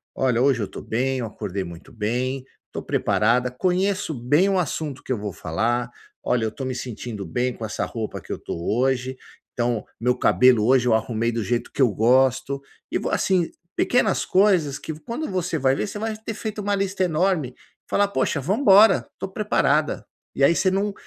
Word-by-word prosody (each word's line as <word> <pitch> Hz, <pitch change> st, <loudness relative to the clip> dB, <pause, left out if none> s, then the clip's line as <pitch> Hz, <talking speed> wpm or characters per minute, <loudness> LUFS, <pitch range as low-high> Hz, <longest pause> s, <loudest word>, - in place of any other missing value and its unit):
“Olha, 125 Hz, -3 st, +1 dB
hoje 130 Hz, -3 st, +3 dB
eu -, -, -3 dB
tô -, -, -9 dB
bem. 130 Hz, +3 st, -1 dB
Eu 120 Hz, -, -3 dB
acordei 100 Hz, -3 st, -4 dB
muito 85 Hz, -1 st, -11 dB
bem. 125 Hz, +5 st, -2 dB, 0.3 s
Tô -, -, -5 dB
preparada. 125 Hz, +3 st, +1 dB
Conheço 185 Hz, +6 st, 0 dB
bem 145 Hz, +9 st, +2 dB
o 195 Hz, -, +2 dB
assunto 155 Hz, -4 st, -3 dB
que -, -, -6 dB
eu -, -, -2 dB
vou 105 Hz, 0 st, -4 dB
falar. 120 Hz, +11 st, -1 dB, 0.3 s
Olha, 120 Hz, -2 st, +1 dB
eu 110 Hz, -, -2 dB
tô 135 Hz, -, -6 dB
me 130 Hz, -, -2 dB
sentindo 115 Hz, -4 st, -6 dB
bem 120 Hz, +9 st, -1 dB
com 115 Hz, -, -9 dB
essa 110 Hz, -, -2 dB
roupa 110 Hz, -2 st, -5 dB
que -, -, -6 dB
eu -, -, -6 dB
tô -, -, -5 dB
hoje. 130 Hz, +7 st, 0 dB, 0.4 s
Então, 120 Hz, -2 st, -1 dB
meu 125 Hz, +1 st, +2 dB
cabelo 125 Hz, -4 st, +4 dB
hoje 125 Hz, 0 st, +4 dB
eu 120 Hz, -, +4 dB
arrumei 115 Hz, +1 st, 0 dB
do 115 Hz, -1 st, -2 dB
jeito 120 Hz, +2 st, -2 dB
que -, -, -2 dB
eu 130 Hz, -, +6 dB
gosto. 130 Hz, +5 st, +2 dB, 0.3 s
E -, -, +1 dB
vou”, -, -, -3 dB
assim, 180 Hz, -3 st, +2 dB, 0.3 s
pequenas 220 Hz, -5 st, +2 dB
coisas 185 Hz, -8 st, +3 dB
que, 160 Hz, -, -6 dB
v 155 Hz, -, -12 dB
quando 300 Hz, +7 st, -3 dB
você 180 Hz, -3 st, -1 dB
vai 135 Hz, -2 st, +2 dB
ver, 210 Hz, -, -2 dB
você 205 Hz, -, -6 dB
vai 220 Hz, 0 st, -2 dB
ter 220 Hz, +1 st, -6 dB
feito 215 Hz, -1 st, -5 dB
uma 205 Hz, 0 st, 0 dB
lista 195 Hz, -1 st, -1 dB
enorme. 160 Hz, -6 st, 0 dB, 0.3 s
Falar: 200 Hz, 0 st, +2 dB
“Poxa, 140 Hz, -4 st, 0 dB
vamos 195 Hz, -, 0 dB
embora. 205 Hz, 0 st, +6 dB
Tô 195 Hz, -, -4 dB
preparada”. 155 Hz, -7 st, +1 dB, 0.3 s
E 135 Hz, -, +1 dB
aí 155 Hz, -, +6 dB
você 190 Hz, +2 st, +2 dB
não 200 Hz, +2 st, 0 dB
130 Hz, 200 wpm, -23 LUFS, 120-185 Hz, 0.4 s, eu